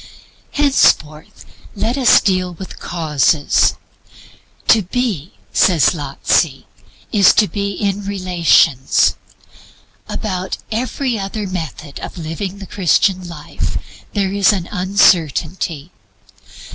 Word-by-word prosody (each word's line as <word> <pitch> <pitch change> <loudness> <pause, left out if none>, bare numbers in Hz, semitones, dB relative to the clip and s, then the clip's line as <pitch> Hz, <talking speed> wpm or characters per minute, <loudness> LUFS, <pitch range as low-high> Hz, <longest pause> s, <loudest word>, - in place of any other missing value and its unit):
Henceforth 160 - +1 0.3
LET 220 +4 -1
US 260 -4 +5
DEAL 185 -2 0
WITH 190 +2 -10
CAUSES. 155 -3 +1 0.9
"To 225 - +6
be," 195 - -3 0.2
says 170 -5 +4
Lotze, 145 -1 0 0.5
"is 200 -3 +5
to 210 - +4
be 200 0 -3
in 200 +1 -2
relations." 175 -8 +2 1.0
About 185 -3 -3
every 245 +1 -2
other 200 +2 -4
method 160 -6 -6
of - - -8
living 175 +4 -5
the 200 - -9
Christian 185 -1 +1
life 160 -4 -5 0.4
there 195 -2 -1
is 200 0 +4
an 190 -4 -3
uncertainty. 175 -4 +1
185 Hz, 100 wpm, -17 LUFS, 165-200 Hz, 1.0 s, To